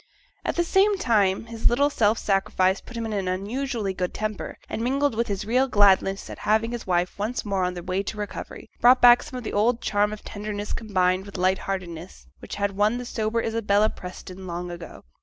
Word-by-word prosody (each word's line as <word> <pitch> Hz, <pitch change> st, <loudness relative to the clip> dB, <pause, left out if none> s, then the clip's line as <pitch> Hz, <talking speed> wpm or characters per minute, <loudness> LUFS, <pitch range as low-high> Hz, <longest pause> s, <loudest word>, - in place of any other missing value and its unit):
At -, -, -2 dB
the 345 Hz, -, +2 dB
same 390 Hz, +4 st, +3 dB
time, 210 Hz, -, +2 dB
his 230 Hz, -1 st, +1 dB
little 280 Hz, +5 st, +2 dB
self 220 Hz, -4 st, +2 dB
sacrifice 195 Hz, -1 st, +1 dB
put 245 Hz, -, -10 dB
him 230 Hz, -, -3 dB
in 220 Hz, -, -3 dB
an 195 Hz, -2 st, -2 dB
unusually 210 Hz, +3 st, -2 dB
good 180 Hz, -1 st, -3 dB
temper; 215 Hz, -1 st, -4 dB
and, 225 Hz, -, -4 dB
mingled 275 Hz, +2 st, +1 dB
with 235 Hz, +1 st, -1 dB
his 200 Hz, +1 st, -3 dB
real 250 Hz, +5 st, +2 dB
gladness 195 Hz, -3 st, +3 dB
at -, -, -9 dB
having 220 Hz, +2 st, +1 dB
his 240 Hz, -3 st, -6 dB
wife 180 Hz, +1 st, 0 dB
once 220 Hz, +4 st, -2 dB
more 195 Hz, -2 st, 0 dB
on 180 Hz, 0 st, -1 dB
the 175 Hz, -, -6 dB
way 185 Hz, +2 st, -1 dB
to 215 Hz, -, -6 dB
recovery, 210 Hz, -1 st, -7 dB
brought 250 Hz, +1 st, +6 dB
back 245 Hz, 0 st, +8 dB
some 280 Hz, -4 st, -8 dB
of 250 Hz, -, -6 dB
the -, -, -5 dB
old 230 Hz, +3 st, +2 dB
charm 205 Hz, -2 st, +1 dB
of 215 Hz, -, -8 dB
tenderness 205 Hz, 0 st, -5 dB
combined 190 Hz, -3 st, 0 dB
with 200 Hz, -, -8 dB
light 185 Hz, +1 st, +2 dB
heartedness, 180 Hz, -3 st, -6 dB
which -, -, -7 dB
had 200 Hz, 0 st, 0 dB
won 210 Hz, +4 st, +1 dB
the 245 Hz, -, -5 dB
sober 230 Hz, 0 st, -1 dB
Isabella 215 Hz, -2 st, +2 dB
Preston 185 Hz, +1 st, -9 dB
long 175 Hz, 0 st, -4 dB
ago. 170 Hz, -1 st, -9 dB
210 Hz, 215 wpm, -25 LUFS, 190-235 Hz, -, back